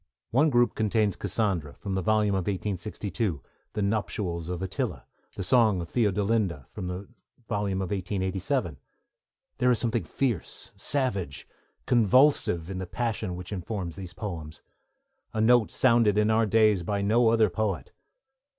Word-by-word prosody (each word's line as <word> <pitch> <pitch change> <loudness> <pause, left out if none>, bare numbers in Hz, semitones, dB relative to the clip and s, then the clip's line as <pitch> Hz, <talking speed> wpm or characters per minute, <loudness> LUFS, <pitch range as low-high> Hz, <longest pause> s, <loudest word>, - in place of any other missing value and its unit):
One 150 +6 +4
group 120 -3 +3
contains 110 -1 +1
Cassandra, 95 -7 -1
from 100 - -5
the 95 - 0
volume 105 +1 +2
of 95 -3 -1
1862, 100 - -3 0.3
The 105 - -1
Nuptials 100 -5 -2
of 90 0 -3
Attila, 95 - -3 0.3
The 95 - -4
Song 110 -3 +4
of 85 - -6
Theodolinda, 105 - 0
from 90 - -6
the 90 +2 -5 0.4
volume 100 -3 -1
of 95 - -5
1887. 95 - -2 0.8
There 125 - +3
is 125 - +4
something 115 0 0
fierce, 120 - -3
savage, 100 - 0 0.4
convulsive, 120 - +4
in 95 0 -5
the 95 - -5
passion 110 -3 -2
which 90 +1 -8
informs 95 -3 -4
these 90 -3 -9
poems; 80 -7 -6 0.7
a - - 0
note 115 0 +4
sounded 115 -5 +3
in 105 +1 +3
our 110 0 +3
days 110 -2 +4
by 100 +3 -2
no 115 +4 +3
other 110 -3 +4
poet. 95 -8 -2
100 Hz, 145 wpm, -27 LUFS, 90-110 Hz, 0.8 s, One